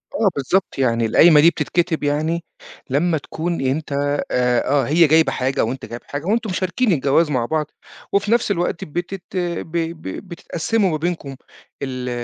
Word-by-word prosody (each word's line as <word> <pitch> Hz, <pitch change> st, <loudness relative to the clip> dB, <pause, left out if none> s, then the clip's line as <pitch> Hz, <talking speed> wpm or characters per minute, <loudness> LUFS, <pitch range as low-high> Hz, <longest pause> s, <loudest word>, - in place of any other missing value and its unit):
آه 225 Hz, -7 st, +3 dB
بالضبط، 180 Hz, +8 st, 0 dB
يعني 120 Hz, -3 st, +1 dB
القايمة 150 Hz, +7 st, +6 dB
دي 165 Hz, -, +7 dB
بتتكتب 175 Hz, -2 st, -1 dB
يعني 155 Hz, +4 st, 0 dB, 0.5 s
لمّا 160 Hz, +5 st, +1 dB
تكون 165 Hz, +3 st, -4 dB
أنت 135 Hz, +4 st, -2 dB, 0.4 s
آآ 125 Hz, -1 st, +2 dB
آه 140 Hz, 0 st, +3 dB
هي 165 Hz, +2 st, +5 dB
جايبة 160 Hz, +2 st, +4 dB
حاجة 130 Hz, +1 st, 0 dB
وأنت 130 Hz, +4 st, -5 dB
جايب 120 Hz, +1 st, -8 dB
حاجة 145 Hz, +2 st, -6 dB
وأنتم 220 Hz, +2 st, 0 dB
مشاركين 185 Hz, +6 st, 0 dB
الجواز 150 Hz, +1 st, +2 dB
مع 125 Hz, -3 st, 0 dB
بعض، 155 Hz, +3 st, -1 dB, 0.5 s
وفي 200 Hz, +2 st, +1 dB
نفس 235 Hz, -3 st, +2 dB
الوقت 175 Hz, -2 st, -1 dB
بتت 175 Hz, +4 st, -5 dB
ب 170 Hz, -2 st, -3 dB
ب 165 Hz, 0 st, -3 dB, 0.3 s
بتتقسّموا 185 Hz, +4 st, -1 dB
ما 155 Hz, -, 0 dB
بينكم 160 Hz, -4 st, -3 dB, 0.5 s
ال 125 Hz, -2 st, -4 dB
160 Hz, 160 wpm, -20 LUFS, 140-175 Hz, 0.5 s, دي